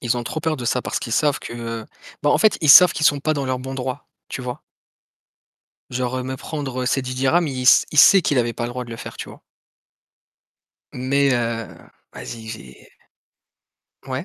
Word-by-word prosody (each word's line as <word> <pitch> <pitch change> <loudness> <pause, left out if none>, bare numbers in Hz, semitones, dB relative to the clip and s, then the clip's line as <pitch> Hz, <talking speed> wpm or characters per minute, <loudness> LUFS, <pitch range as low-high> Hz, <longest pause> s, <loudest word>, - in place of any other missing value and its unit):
Ils 120 0 -1
ont 120 - -3
trop 155 - -4
peur 160 -1 -1
de 125 - -7
ça 125 +1 0
parce - - -3
qu'ils 115 - -6
savent 145 +3 +1
que 115 -1 -6 0.4
bah, 145 - +2
en - - +3
fait 215 -1 +3
ils 155 - -1
savent 180 +3 +9
qu'ils 155 - +1
sont 145 -1 +2
pas 155 +2 0
dans 140 -1 -3
leurs 130 -1 -2
bons 130 +1 -7
droits, 130 +1 -5 0.2
tu - - -6
vois? 125 -1 -6 1.3
Genre, 125 0 -3
heu, - - -3
me 130 +1 -5
prendre, 140 -2 -6
heu, - - -3
ces 135 +1 0
10 130 0 -5
dirhams, 155 +6 +2
il 130 -2 -4
s 125 - +6
il 150 - -2
sait 195 +5 +7
qu'il 145 - +1
avait 120 -1 0
le 120 - -2
droit 125 +1 -5
de 120 - -12
le 115 - -6
faire, - - -9
tu - - -7
vois? - - -14 1.5
Mais, 135 +2 +1
heu, 115 -2 -2 0.4
vas-y, 115 -2 -9
j'ai 65 - -11 1.1
Ouais? - - -4
130 Hz, 210 wpm, -21 LUFS, 120-145 Hz, 1.5 s, savent